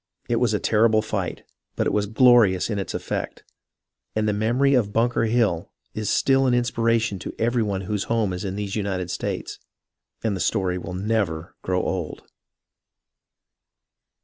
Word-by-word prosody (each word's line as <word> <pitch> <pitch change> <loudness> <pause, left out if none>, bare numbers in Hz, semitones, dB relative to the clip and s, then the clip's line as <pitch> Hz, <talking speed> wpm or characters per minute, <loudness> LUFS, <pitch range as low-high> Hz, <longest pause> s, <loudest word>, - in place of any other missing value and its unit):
It 120 - +1
was 120 -2 +2
a - - 0
terrible 110 +1 +3
fight, 100 -4 -3 0.3
but - - 0
it - - 0
was 105 -1 +1
glorious 110 -4 +4
in 105 - -1
its 95 - -4
effect; - - -4 0.7
and 110 0 +1
the 105 - +2
memory 120 +7 +2
of 115 -6 +2
Bunker 115 +2 +1
Hill 110 -7 +1 0.2
is 110 -1 -3
still 135 0 +3
an 125 - +3
inspiration 115 -4 +1
to - - -7
every 120 +1 +1
one 100 -3 -1
whose 105 0 -2
home 110 -5 0
is 90 - -5
in 95 -1 -3
these 100 -1 -4
United 95 -4 -2
States, - - -4 0.6
and 110 -3 0
the - - -5
story 90 -4 0
will 90 +1 -6
never 95 -5 -1
grow 90 0 -1
old. 90 -5 -3
105 Hz, 165 wpm, -24 LUFS, 95-115 Hz, 0.7 s, glorious